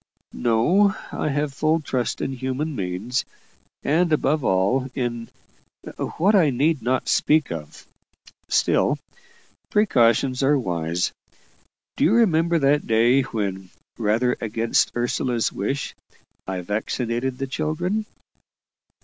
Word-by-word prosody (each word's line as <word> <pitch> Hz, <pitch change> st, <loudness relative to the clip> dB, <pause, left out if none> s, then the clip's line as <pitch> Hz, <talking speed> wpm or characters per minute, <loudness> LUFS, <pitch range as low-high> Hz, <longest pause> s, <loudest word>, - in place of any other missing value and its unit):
"No; 170 Hz, -, +3 dB, 0.2 s
I -, -, -2 dB
have 145 Hz, 0 st, -1 dB
full 155 Hz, +3 st, +1 dB
trust 130 Hz, -5 st, -2 dB
in -, -, -2 dB
human 130 Hz, +4 st, -3 dB
means, 100 Hz, +5 st, -2 dB, 0.6 s
and 165 Hz, +4 st, +2 dB
above 150 Hz, -1 st, +1 dB
all, 120 Hz, +8 st, +1 dB
in 120 Hz, -3 st, -3 dB, 0.9 s
what 195 Hz, +6 st, +3 dB
I 180 Hz, -7 st, +5 dB
need 140 Hz, +4 st, +1 dB
not 130 Hz, +1 st, 0 dB
speak 155 Hz, -, +2 dB
of. 75 Hz, -3 st, -8 dB, 0.6 s
Still, -, -, +2 dB, 0.7 s
precautions 130 Hz, -, +3 dB
are 140 Hz, +2 st, +3 dB
wise. 85 Hz, -6 st, -1 dB, 0.9 s
Do -, -, +1 dB
you 185 Hz, -, +4 dB
remember 170 Hz, -7 st, +3 dB
that 145 Hz, 0 st, +2 dB
day 120 Hz, +4 st, +4 dB
when, 100 Hz, -7 st, -4 dB, 0.3 s
rather 115 Hz, +3 st, +1 dB
against 115 Hz, +1 st, +1 dB
Ursula's 120 Hz, 0 st, 0 dB
wish, 135 Hz, +8 st, -3 dB, 0.5 s
I 95 Hz, -1 st, -3 dB
vaccinated 115 Hz, +6 st, -2 dB
the 135 Hz, -, -2 dB
children?" 175 Hz, +10 st, -2 dB
130 Hz, 115 wpm, -23 LUFS, 115-155 Hz, 0.9 s, I